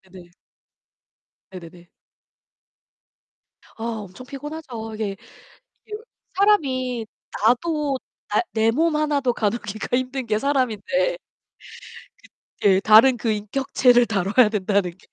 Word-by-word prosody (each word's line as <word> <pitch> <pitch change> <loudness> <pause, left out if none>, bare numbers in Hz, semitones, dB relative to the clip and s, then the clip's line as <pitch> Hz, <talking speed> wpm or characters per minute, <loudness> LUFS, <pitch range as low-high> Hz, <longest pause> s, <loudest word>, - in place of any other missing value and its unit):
네네. 180 -2 -16 1.3
네네네. 170 +1 -14 1.9
아 225 - -7
엄청 220 +1 -6
피곤하죠. 275 -6 -7
이게 210 -2 -4 0.8
여 - - -3 0.4
사람이 260 - +1 0.4
나도 285 +3 +1 0.3
나 - - +2
내 225 0 +2
몸 320 +5 +1
하나도 290 -5 +1
가누기가 215 +1 -2
힘든 260 0 -3
게 215 -2 0
사람인데. 280 - 0 1.0
그 - - -20 0.5
예. - - +1
다른 220 +5 +6
그 225 0 -2
인격체를 245 +3 +2
다뤄야 210 +3 +3
된다는 200 -3 0
게 - - -24
240 Hz, 210 characters per minute, -22 LUFS, 210-275 Hz, 1.9 s, 다른